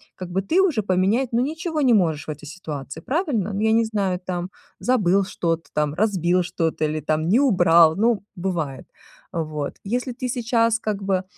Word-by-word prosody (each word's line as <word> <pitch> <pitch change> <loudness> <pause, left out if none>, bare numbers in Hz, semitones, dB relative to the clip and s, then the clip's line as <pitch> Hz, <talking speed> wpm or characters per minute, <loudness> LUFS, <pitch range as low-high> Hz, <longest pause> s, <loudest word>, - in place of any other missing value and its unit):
как 185 -1 -7
бы 190 +2 0
ты 320 - +1
уже 325 -13 +2
поменять, 195 +7 +1
ну, 230 - +3
ничего 315 +3 -2
не 255 -4 +4
можешь 165 -8 +1
в - - -2
этой 150 0 -9
ситуации, 145 -5 -7
правильно? 260 - -1
Ну, 200 - -2
я 220 0 +3
не 230 0 +3
знаю, 200 -5 -1
там 180 0 -3 0.3
забыл 200 -6 +2
что-то 165 -4 -2
там, 150 -1 0
разбил 180 -1 +1
что-то 165 -2 -1
или 155 0 -1
там 155 +2 0
не 220 +7 +4
убрал, 170 - +5
ну 220 0 +1
бывает. 170 -7 -3 0.5
Э, 165 - -1
вот, 150 -2 -5
если 245 +4 -2
ты 250 +1 -4
сейчас 230 -1 +1
как 210 -3 -3
бы, 190 -1 0
190 Hz, 190 wpm, -23 LUFS, 165-230 Hz, 0.5 s, убрал